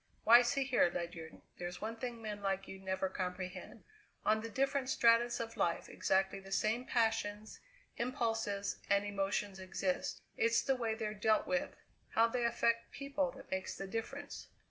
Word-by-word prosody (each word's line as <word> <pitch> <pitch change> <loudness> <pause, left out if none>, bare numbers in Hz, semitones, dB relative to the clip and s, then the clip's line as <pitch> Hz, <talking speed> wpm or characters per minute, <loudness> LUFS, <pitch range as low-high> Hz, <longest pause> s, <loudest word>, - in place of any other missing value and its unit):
Why, 235 +2 +9
see 270 +3 +1
here, 250 -9 +3
Ledyard, 170 -2 -6 0.2
there's 175 0 -5
one 220 +2 -3
thing 235 -1 -5
men 210 -1 -4
like 195 -1 -1
you 190 - -8
never 190 0 -1
comprehend. 185 +2 -5 0.4
On 215 0 +3
the 230 - -5
different 270 +2 0
stratas 235 -1 +4
of 230 0 -4
life 170 - 0
exactly 190 +1 +1
the 195 0 -12
same 220 +5 +1
passions, 220 -3 0 0.4
impulses, 225 -5 -1
and 200 +1 +3
emotions 200 -1 -1
exist; 185 0 -2
it's 230 0 +3
the 270 - +2
way 230 -3 -1
they're 215 -2 -3
dealt 215 +1 +2
with, 275 +1 -1 0.4
how 225 - +6
they 240 +1 0
affect 235 0 +1
people, 280 -1 -1
that 270 - -13
makes 190 0 -2
the 195 - -5
difference. 230 +8 -5
220 Hz, 165 wpm, -35 LUFS, 195-240 Hz, 0.4 s, Why